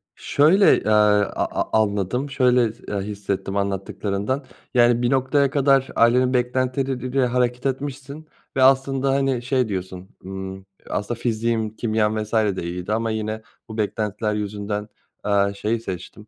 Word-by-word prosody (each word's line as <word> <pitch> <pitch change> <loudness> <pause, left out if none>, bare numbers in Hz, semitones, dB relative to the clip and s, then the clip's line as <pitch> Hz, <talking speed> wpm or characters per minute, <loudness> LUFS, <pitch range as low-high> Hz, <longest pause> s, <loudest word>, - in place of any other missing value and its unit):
şöyle, 170 +8 +4
eee, - - -7
a 105 -1 +3 0.2
a 110 - +1
anladım, 105 +7 -2
şöyle 125 -4 +3
s 120 - -23
eee, 105 - -3
his 100 - -6
hissettim 100 0 -3
anlattıklarından, 100 +6 -2 0.3
yani, 120 -1 +4
bir 120 - +1
noktaya 135 +1 +2
kadar 135 -1 +3
ailenin 125 +2 +4
beklentileri 130 +1 0
ile 130 0 +1
hareket 125 +1 0
etmişsin 140 +3 -4 0.3
ve 130 - +3
aslında, 135 0 +3
hani, 135 -3 +1
şey 125 -1 0
diyorsun, 95 -1 -5 0.2
ımm, 95 0 -7 0.2
"Aslında 115 +3 -3
fiziğim, 110 -2 -1
kimyam 110 -1 0
vs. 105 - -12
de 105 -5 +1
iyiydi 90 +4 -3
ama 115 0 0
yine 110 0 -3 0.3
bu 110 - -7
beklentiler 105 0 -1
yüzünden, 105 0 -3 0.4
eee, 100 -1 +2
şeyi 110 +3 -1
seçtim, 95 +2 -8
115 Hz, 150 wpm, -22 LUFS, 105-130 Hz, 0.4 s, şöyle